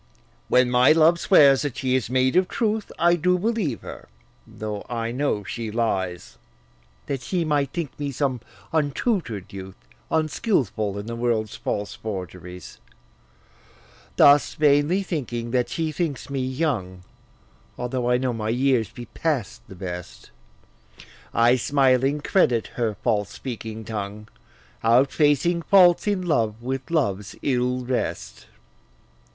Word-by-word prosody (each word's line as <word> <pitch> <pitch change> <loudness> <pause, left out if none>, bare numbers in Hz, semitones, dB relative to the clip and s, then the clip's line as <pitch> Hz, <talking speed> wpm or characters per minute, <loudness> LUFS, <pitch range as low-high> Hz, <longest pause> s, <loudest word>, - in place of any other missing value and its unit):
When 125 0 +3
my 125 +4 +6
love 165 +2 +4
swears 140 -8 +6
that 145 -4 -3
she 130 -1 0
is 130 -3 -1
made 130 +2 +2
of 185 0 +4
truth, 220 0 -1
I 175 +1 +4
do 180 +2 +2
believe 200 - -1
her, - - -10 0.4
though 105 -1 -6
I 115 -1 -2
know 125 -5 -1
she 115 +2 -5
lies, 95 -6 -2 0.7
That 135 -2 -3
she 170 +7 -1
might 145 -3 0
think 170 -5 -5
me 145 -1 -2
some 130 -3 -1 0.3
untutor'd 145 - -1
youth, 95 -1 -8 0.3
Unskilful 150 - 0
in 100 - -5
the 115 +1 -5
world's 115 -3 -1
false 105 0 -3
forgeries, 90 -4 -8 1.4
Thus 145 0 +5
vainly 150 +6 +3
thinking 120 -9 -4
that 125 -1 +1
she 160 +6 -2
thinks 150 -3 -3
me 135 -1 -1
young, 130 - -2 0.7
Although 125 0 -2
I 125 - +4
know 125 -1 -1
my 110 -1 -3
years 125 -3 +1
be 120 - -9
past 140 - -3
the 95 - -11
best, 90 -1 -8 1.0
I 120 +2 +4
smiling 135 +2 +2
credit 125 - +2
her 115 -4 -1
false 105 -2 +1
speaking 110 -3 -7
tongue, 105 0 -6 0.5
Outfacing 145 +8 +3
faults 180 0 +5
in 200 -3 0
love 115 -9 0
with 130 +3 -4
love's 105 - -1
ill 125 -1 0
rest. 125 0 -3
125 Hz, 135 wpm, -24 LUFS, 110-150 Hz, 1.4 s, my